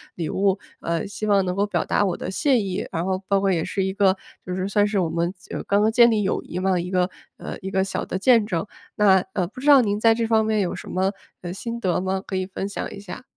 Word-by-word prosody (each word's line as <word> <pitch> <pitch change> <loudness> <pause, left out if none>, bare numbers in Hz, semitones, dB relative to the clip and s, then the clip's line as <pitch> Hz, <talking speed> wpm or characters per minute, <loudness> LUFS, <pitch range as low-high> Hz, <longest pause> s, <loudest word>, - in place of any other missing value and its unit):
礼 165 -3 -3
物， 195 0 +1 0.2
呃， 170 +2 -2
希 205 +2 -5
望 200 -2 +3
能 180 0 -2
够 200 +1 +2
表 205 - -1
达 205 - +2
我 185 - 0
的 - - -5
谢 255 +5 +2
意， 190 -3 -3
然 165 +2 -2
后 190 0 0
包 200 -1 +3
括 195 0 +1
也 165 -3 +1
是 195 - -1
一 190 - -2
个 195 -1 +3 0.3
就 180 - -4
是 185 +1 -2
算 205 0 +3
是 205 -2 0
我 170 -3 0
们 170 +2 -1
就 - - -7
刚 200 +1 +2
刚 215 - +4
建 235 0 +6
立 210 -2 +1
友 190 - 0
谊 180 - -5
嘛， 185 -1 +1
一 180 +1 -4
个， 180 0 +2 0.3
呃， - - -7
一 190 +1 -6
个 190 0 +2
小 190 - -3
的 - - -3
见 230 -1 +5
证。 185 -2 -2 0.3
那， 190 -3 +5
呃， 180 -3 0
不 250 +6 -11
知 290 - -4
道 275 -3 +9
您 205 -2 0
在 225 0 +5
这 225 0 -1
方 220 -1 +3
面 215 -1 +1
有 180 - -1
什 - - -9
么， 190 +1 0 0.3
呃， 175 0 -5
心 235 +4 -5
得 180 -4 0
吗？ 190 0 -1
可 190 - -4
以 185 0 -1
分 195 +1 -5
享 200 - -5
一 200 - -8
下。 200 +5 -9
195 Hz, 300 characters per minute, -23 LUFS, 185-210 Hz, 0.3 s, 道